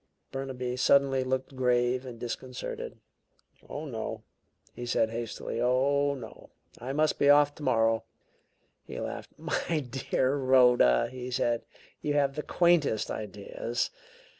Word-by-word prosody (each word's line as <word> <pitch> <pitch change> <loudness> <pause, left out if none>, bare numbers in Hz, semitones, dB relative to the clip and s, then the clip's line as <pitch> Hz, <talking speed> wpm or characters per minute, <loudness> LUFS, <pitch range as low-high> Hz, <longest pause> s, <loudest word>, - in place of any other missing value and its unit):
Burnaby 130 -2 -4
suddenly 135 0 +4
looked 130 +1 -2
grave 125 0 +1
and 120 -2 -8
disconcerted. 125 +1 -5 0.7
"Oh, 150 +2 -5
no!" 110 -4 -5 0.5
he 120 - -7
said, 115 -2 +1
hastily. 115 0 -4
"Oh, 140 +3 +2
no! 115 -5 -11 0.3
I 125 +3 -4
must 155 +2 +1
be 140 - +4
off 145 0 +6
tomorrow." 115 -6 +1 0.8
He - - -7
laughed. - - -5
"My 165 - -1
dear 130 0 -1
Rhoda," 125 - +5
he 125 -1 -6
said, 120 -2 0 0.4
"you 145 -1 -1
have 140 -1 +2
the 150 - -2
quaintest 170 -10 +2
ideas. 105 +3 -3
130 Hz, 125 wpm, -29 LUFS, 120-140 Hz, 0.8 s, off